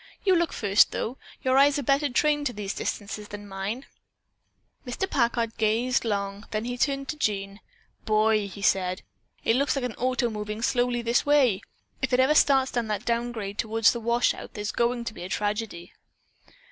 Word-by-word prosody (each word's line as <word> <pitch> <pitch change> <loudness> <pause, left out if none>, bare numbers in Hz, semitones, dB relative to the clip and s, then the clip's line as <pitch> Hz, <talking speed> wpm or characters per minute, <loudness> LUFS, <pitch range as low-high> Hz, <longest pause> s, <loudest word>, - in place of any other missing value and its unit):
You 380 -2 +5
look 340 -1 +1
first, 200 0 +3
though. 245 +4 -3 0.2
Your 260 +1 +4
eyes 285 +1 +5
are 285 - -2
better 280 +3 +2
trained 295 +3 +2
to 245 - -4
these 205 -1 -4
distances 210 0 -4
than 205 0 -9
mine." 200 +7 -4 1.0
Mr. 250 +9 -3
Packard 235 - 0
gazed 225 +3 +1
long, 200 -1 -3
then 215 +1 -2
he 245 0 -3
turned 275 +2 0
to 305 - -3
Jean. 200 -5 -2 0.4
"Boy," 215 -1 +2
he 200 0 -9
said, 185 -2 +1 0.4
"it 225 - +3
looks 280 +2 +1
like 270 -2 -1
an 245 - -3
auto 250 -1 0
moving 210 +1 -5
slowly 245 -1 +1
this 235 +2 +2
way. 275 -9 +3 0.4
If 265 -1 -1
it 250 - +4
ever 265 +3 +5
starts 270 -4 +3
on 235 -2 0
that 210 -2 -3
down 235 0 0
grade 205 -3 -6
toward 225 +1 -2
the 235 - +5
washout 235 +1 0
there 210 - -4
is 210 - -2
going 235 0 0
to 230 - -5
be 175 - -10
a 180 - -6
tragedy." 205 -4 -3
235 Hz, 190 wpm, -26 LUFS, 210-255 Hz, 1.0 s, You